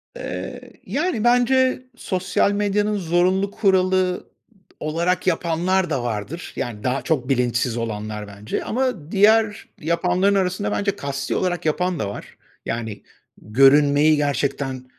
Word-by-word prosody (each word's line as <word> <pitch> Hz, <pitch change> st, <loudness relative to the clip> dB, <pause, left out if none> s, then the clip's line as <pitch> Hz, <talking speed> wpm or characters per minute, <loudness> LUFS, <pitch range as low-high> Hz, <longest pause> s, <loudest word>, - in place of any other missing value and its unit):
Eee, -, -, -6 dB, 0.2 s
yani, 295 Hz, -7 st, -1 dB
bence 255 Hz, +1 st, +3 dB
sosyal 185 Hz, -2 st, 0 dB
medyanın 205 Hz, +1 st, 0 dB
zorunlu 185 Hz, +3 st, +1 dB
kuralı 185 Hz, -2 st, +2 dB
ıd -, -, -11 dB, 0.5 s
olarak 170 Hz, +4 st, -1 dB
yapanlar 175 Hz, +1 st, +1 dB
da 135 Hz, -6 st, -1 dB
vardır. 120 Hz, +9 st, -5 dB
Yani 115 Hz, -5 st, -5 dB
daha 130 Hz, +2 st, 0 dB
çok 130 Hz, -6 st, -1 dB
bilinçsiz 125 Hz, -2 st, +1 dB
olanlar 105 Hz, -2 st, -4 dB
bence 100 Hz, +2 st, -5 dB
ama 225 Hz, -, -2 dB
diğer 210 Hz, +1 st, +3 dB
yapanların 180 Hz, +5 st, +1 dB
arasında 185 Hz, +1 st, 0 dB
bence 200 Hz, -1 st, 0 dB
kasti 140 Hz, -4 st, -3 dB
olarak 175 Hz, -3 st, -1 dB
yapan 180 Hz, +3 st, 0 dB
da 100 Hz, -, -2 dB
var. -, -, -9 dB, 0.3 s
Yani 110 Hz, -3 st, -4 dB, 0.4 s
görünmeyi 145 Hz, +6 st, +5 dB
gerçekten, 140 Hz, -2 st, -1 dB
170 Hz, 125 wpm, -22 LUFS, 135-195 Hz, 0.5 s, görünmeyi